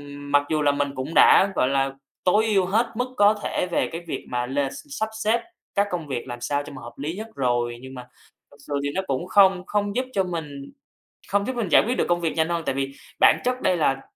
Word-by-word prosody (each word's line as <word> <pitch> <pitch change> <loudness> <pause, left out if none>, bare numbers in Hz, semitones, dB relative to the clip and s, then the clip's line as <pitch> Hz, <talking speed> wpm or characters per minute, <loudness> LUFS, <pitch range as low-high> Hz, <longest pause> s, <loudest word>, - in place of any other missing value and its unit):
mặc 145 0 +1
dù 155 -1 +1
là 145 -1 +4
mình 145 0 -1
cũng 130 +4 -4
đã, 195 - +6
gọi 130 - +2
là, 135 0 +1 0.3
tối 210 +4 +3
ưu 200 -4 +2
hết 220 +6 +2
mức 250 +2 -3
có 205 +1 +6
thể - - -1
về - - +1
cái 165 - -5
việc - - -5
mà 120 0 -1
l 135 +3 -2
sắp 275 -7 -5
xếp 225 +3 +2 0.3
các 200 +1 +2
công 170 -4 -3
việc 130 -2 -4
làm 120 -1 -7
sao 145 +4 -1
cho - - -10
mà 130 - -9
hợp 120 - -10
lý 150 +5 -4
nhất 215 +3 -6
rồi, 120 -2 0
nhưng 130 0 -10
mà 125 -1 -9 0.4
thật 145 - -18
sự - - -4
thì 145 - 0
nó 190 - +1
cũng 140 +6 -2
không 190 -1 +4
không 205 0 -1
giúp 255 - 0
cho 195 - +2
mình 150 -6 -6 0.6
không 200 0 +1
giúp 260 - -2
mình 235 -4 -1
giải - - +7
quyết 245 +3 0
được - - +2
công 175 0 +2
việc 165 -2 -1
nhanh 160 0 +1
hơn. 170 -1 -1
Tại - - -1
vì 135 0 -2 0.3
bản - - +6
chất 250 +1 -1
đây 180 - +2
là 135 -4 +1
165 Hz, 255 wpm, -24 LUFS, 135-200 Hz, 0.6 s, giải